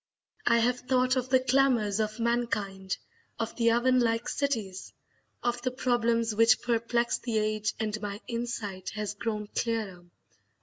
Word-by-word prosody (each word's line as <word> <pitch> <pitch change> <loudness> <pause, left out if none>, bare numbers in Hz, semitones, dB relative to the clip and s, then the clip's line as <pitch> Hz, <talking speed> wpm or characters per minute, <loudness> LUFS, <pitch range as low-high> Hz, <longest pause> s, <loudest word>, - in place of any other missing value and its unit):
I 235 - +5
have 245 +2 +2
thought 255 0 +2
of 255 0 -1
the 260 0 +5
clamours 255 -5 +2
of 215 +1 -1
mankind, 210 -5 -1 0.4
of 225 -1 -3
the 230 -1 +3
oven 250 +2 +3
like 230 -1 +1
cities, 220 -10 -2 0.5
of 240 0 0
the 255 - 0
problems 235 -3 +1
which 230 +2 +4
perplex 235 0 +1
the 230 -3 -2
age, 215 0 0
and 215 -1 -2
my 205 -1 -4
insight 230 -5 -4
has 210 -1 -3
grown 210 0 -3
clearer. 215 -6 -2
230 Hz, 145 wpm, -29 LUFS, 215-245 Hz, 0.5 s, I